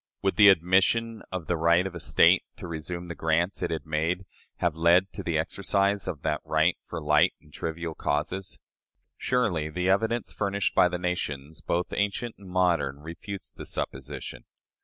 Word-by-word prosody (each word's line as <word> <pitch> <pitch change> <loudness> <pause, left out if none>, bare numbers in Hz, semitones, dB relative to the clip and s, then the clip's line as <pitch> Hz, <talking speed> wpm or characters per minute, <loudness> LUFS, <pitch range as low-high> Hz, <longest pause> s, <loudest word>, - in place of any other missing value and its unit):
Would 95 - +1
the 105 -1 +8
admission 95 +6 +3
of 90 -3 -4
the 90 - 0
right 85 +2 +3
of 95 - -4
a 85 - -6
State - - +4
to - - -8
resume 85 +2 -5
the 85 - -5
grants 85 +3 0
it 90 - -1
had 80 - -3
made, 80 +4 -1 0.3
have 85 -2 +1
led 85 +4 +3
to - - -5
the 85 -2 -1
exercise 100 +4 0
of 75 - -5
that 75 -2 0
right - - +2
for 85 - -5
light 75 -1 +3
and 75 - -22
trivial 80 0 -4
causes? 80 +7 -2 0.6
Surely 95 -12 0
the 90 +4 -1
evidence 110 +4 +1
furnished 100 -1 -1
by 90 - +5
the 90 - -2
nations, 80 -4 -3
both 85 +1 -1
ancient 105 +3 -1
and 100 -2 -12
modern, 85 -7 +1
refutes 85 +5 -7
the - - -10
supposition. 65 -2 -5
85 Hz, 175 wpm, -27 LUFS, 80-95 Hz, 0.6 s, the